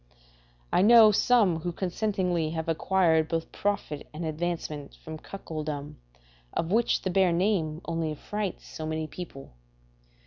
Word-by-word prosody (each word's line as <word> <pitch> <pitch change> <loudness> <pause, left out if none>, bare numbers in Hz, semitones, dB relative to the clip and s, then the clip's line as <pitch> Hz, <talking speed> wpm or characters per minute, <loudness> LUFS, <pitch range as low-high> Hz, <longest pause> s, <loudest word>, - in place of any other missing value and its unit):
I - - +5
know 220 +1 +8
some 205 -6 +3
who 175 +2 -3
consentingly 180 -3 -1
have 160 -1 -3
acquired 165 -1 +2
both 165 0 -3
profit 200 -8 -2
and 165 +2 -4
advancement 155 -2 -3
from 160 0 -9
cuckoldom, 150 -6 -6 0.6
of 165 +1 -1
which 230 +3 +2
the 185 - -1
bare 190 -1 +4
name 170 -3 0
only 165 -2 -1
affrights 200 +5 -4
so 155 - -6
many 155 0 -2
people. 155 -4 -9
170 Hz, 135 wpm, -28 LUFS, 155-190 Hz, 0.6 s, know